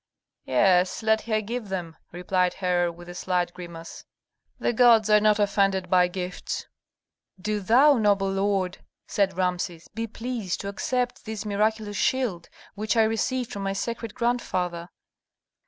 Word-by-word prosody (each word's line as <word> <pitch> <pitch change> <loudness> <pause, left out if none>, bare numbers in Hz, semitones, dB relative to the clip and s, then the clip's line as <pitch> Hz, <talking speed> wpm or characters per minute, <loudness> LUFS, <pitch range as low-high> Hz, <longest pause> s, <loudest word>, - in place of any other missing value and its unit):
"Yes, 180 - +3
let 220 0 +3
her 215 -1 +1
give 225 0 -5
them," 175 -4 -4 0.2
replied 180 +1 0
Herhor, 175 -2 +1
with 175 +1 -13
a 175 - -8
slight 180 -1 -1
grimace. 170 -2 -9 0.5
"The - - 0
gods 225 -3 +5
are 210 - +7
not 210 0 +4
offended 195 -3 +1
by 180 -1 +5
gifts." 180 0 -5 0.7
"Do 210 +2 -2
thou, 250 +7 +5
noble 200 -2 +2
lord," 195 -1 0 0.3
said 195 -3 0
Rameses, 180 -2 -2
"be 225 +1 -3
pleased 225 -4 -4
to 200 - -4
accept 245 +4 -2
this 220 -1 -5
miraculous 210 0 0
shield, 230 -10 0 0.2
which 215 +2 -1
I 225 - +6
received 230 +3 -1
from 200 - -5
my 195 0 -1
sacred 230 +2 -4
grandfather." 180 -8 -1
200 Hz, 145 wpm, -25 LUFS, 180-220 Hz, 0.7 s, are